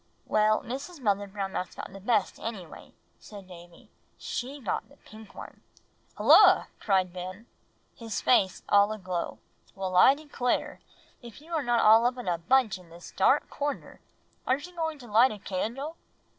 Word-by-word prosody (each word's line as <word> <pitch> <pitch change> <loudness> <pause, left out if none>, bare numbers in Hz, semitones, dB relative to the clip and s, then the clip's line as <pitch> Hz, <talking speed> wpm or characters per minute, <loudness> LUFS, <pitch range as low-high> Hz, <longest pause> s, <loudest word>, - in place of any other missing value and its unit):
"Well, 215 0 +2
Mrs. 275 +7 -7
Mother 205 -4 0
Brown 195 -1 -5
Mouse 185 - -5
got - - -8
the 195 - -9
best 210 -1 0
anyway," 200 -8 -8 0.3
said 200 -3 -12
Davie; 175 -1 -15 0.3
"she 270 +4 -5
got 230 - -4
the - - -20
pink 215 -2 -15
one." - - -11 0.6
"Hulloa!" - - +6
cried 185 -3 +1
Ben 180 -1 -6
rushing 225 +4 -19 0.5
in, 230 - -10
his 225 - -3
face 195 -7 +2
all 205 +1 +4
aglow. 185 -5 -4 0.4
"Well, 190 -1 -4
I 260 +9 +7
declare, 285 -4 -2 0.4
if 235 -1 -12
you 325 +3 -12
are 320 - +1
not 240 -3 +1
all 225 +2 +6
up 250 +1 -3
in 245 - -7
a 175 -2 0
bunch 215 +2 +2
in 180 -2 -18
this 170 +1 -13
dark - - +3
corner. 290 0 -5 0.5
Aren't 265 +3 0
you 360 0 -14
going 320 -2 -3
to 250 -4 -13
light 230 +5 +4
a 215 - -7
candle?" 235 - -4
215 Hz, 175 wpm, -28 LUFS, 190-255 Hz, 0.6 s, I